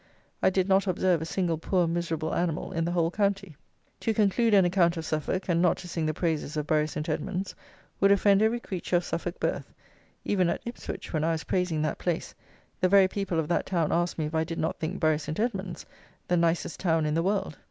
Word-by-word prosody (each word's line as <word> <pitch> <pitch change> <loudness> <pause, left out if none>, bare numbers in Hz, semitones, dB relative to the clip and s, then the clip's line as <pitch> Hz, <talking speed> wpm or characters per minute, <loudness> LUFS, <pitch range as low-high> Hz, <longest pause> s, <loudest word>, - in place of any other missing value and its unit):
I - - +5
did 190 0 +1
not 195 +1 +3
observe 180 -2 +2
a - - -3
single 170 -3 -1
poor 180 +1 +1
miserable 165 -1 -2
animal 170 -2 -1
in 165 0 -1
the 170 - -1
whole 170 -1 +1
county. 195 -4 -1 0.4
To 225 - -1
conclude 215 +2 +3
an 195 -2 +6
account 175 -1 +2
of 160 - -4
Suffolk, 155 +5 -2
and 170 -2 +2
not 180 - +3
to 180 - -9
sing 165 -2 -2
the 155 - 0
praises 160 -3 -1
of 150 - -1
Bury 155 0 +2
St. 150 0 -5
Edmund's, 185 +2 -3 0.5
would 195 0 +5
offend 200 0 +4
every 225 +2 +2
creature 185 -5 -3
of 175 - +3
Suffolk 175 +1 -4
birth; - - -2 0.5
even 185 -4 +2
at - - -2
Ipswich, 235 -5 -7
when 155 -1 0
I 165 +1 +2
was 160 - -3
praising 175 -4 0
that 155 - -2
place, 175 -2 -2 0.5
the 185 - +3
very 195 -1 +6
people 190 -3 -3
of 155 - -1
that 175 - 0
town 170 -5 0
asked 175 +1 0
me 155 - -1
if 150 - -5
I 160 0 +2
did 165 +1 -5
not 160 - -2
think 165 +4 -3
Bury 155 -2 +2
St. 155 +3 -5
Edmund's 195 -6 -2 0.4
the 180 - +2
nicest 170 -1 0
town 165 -4 +1
in 150 - 0
the 165 - +2
world. 190 -4 -1
175 Hz, 225 wpm, -27 LUFS, 160-190 Hz, 0.5 s, an